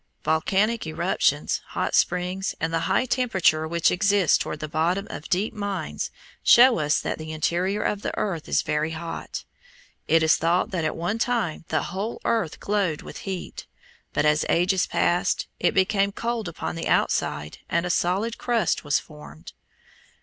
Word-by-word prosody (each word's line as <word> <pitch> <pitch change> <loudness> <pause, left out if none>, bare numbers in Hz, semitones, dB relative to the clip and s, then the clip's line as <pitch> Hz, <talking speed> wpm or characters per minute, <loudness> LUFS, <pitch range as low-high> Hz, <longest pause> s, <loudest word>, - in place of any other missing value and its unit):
Volcanic 200 +6 +1
eruptions, 155 - 0
hot - - -3
springs, 180 +2 +1
and 165 0 -2
the 165 - +2
high - - +2
temperature 190 -11 +2
which 170 +1 +2
exists 200 -1 +3
toward - - -2
the 155 - -4
bottom 170 +6 0
of 150 - -8
deep 195 +5 0
mines 200 -6 -3 0.3
show 245 -3 +7
us 150 -1 +2
that - - -3
the 155 0 -6
interior 180 +6 0
of 205 - -1
the - - -2
earth 175 -7 -2
is - - +2
very 150 +1 0
hot. 165 +1 -6 0.6
It 165 0 +4
is 160 - +5
thought 170 +3 +1
that 180 -4 -1
at 155 - -1
one 180 +7 -2
time 230 -10 -1
the 155 - 0
whole 195 +6 -4
earth 220 -9 0
glowed 200 -7 -1
with - - -9
heat, 185 -2 -6 0.4
but - - 0
as 150 +1 +3
ages 180 +2 +2
passed 175 +1 +1
it - - +1
became 195 +1 +2
cold 230 0 -3
upon 170 - -4
the 165 - -4
outside 75 +1 0
and 170 - +1
a 180 - 0
solid 195 +7 0
crust 230 -7 0
was 145 -1 +2
formed. 115 - -11
180 Hz, 165 wpm, -25 LUFS, 160-205 Hz, 0.6 s, show